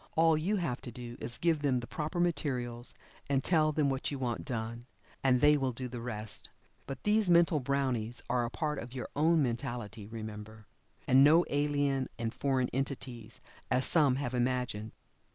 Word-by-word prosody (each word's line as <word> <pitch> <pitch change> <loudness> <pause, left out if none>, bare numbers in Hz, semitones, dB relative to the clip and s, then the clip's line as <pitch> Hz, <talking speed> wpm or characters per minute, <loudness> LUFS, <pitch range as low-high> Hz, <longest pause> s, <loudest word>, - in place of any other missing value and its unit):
All 165 0 +5
you 175 +8 0
have 170 -10 -2
to 120 - -7
do 120 0 -8
is 120 - -2
to - - -9
give 165 -3 +2
them 135 -4 +2
the 120 - -6
proper 155 +7 -4
materials, 130 -8 -1 0.3
and 135 -1 +2
tell 155 -3 +3
then 150 -1 +1
what 135 -1 -1
you 140 - -4
want 125 -3 -2
done, 115 0 -4 0.4
and 125 -2 +4
they 150 0 +6
will 135 -3 0
do 125 +2 -4
the 120 -1 -6
rest. 110 -3 -4 0.4
But 135 - -6
these 210 -2 +3
mental 170 -2 +5
brownies 125 -4 -1
are 125 - +1
a 120 - -2
part 150 +1 -2
of 120 +2 -8
your 125 - -5
own 160 +1 +4
mentality, 120 -3 -4
remember, 110 -1 -8 0.4
and 130 +2 +7
no 160 +4 +6
alien 145 -2 +1
and 115 -1 -3
foreign 130 -3 0
entities, 125 -4 -4 0.3
as 130 +1 +2
some 145 -6 +4
have 130 -2 -3
imagined. 125 -4 -1
130 Hz, 185 wpm, -31 LUFS, 120-150 Hz, 0.4 s, and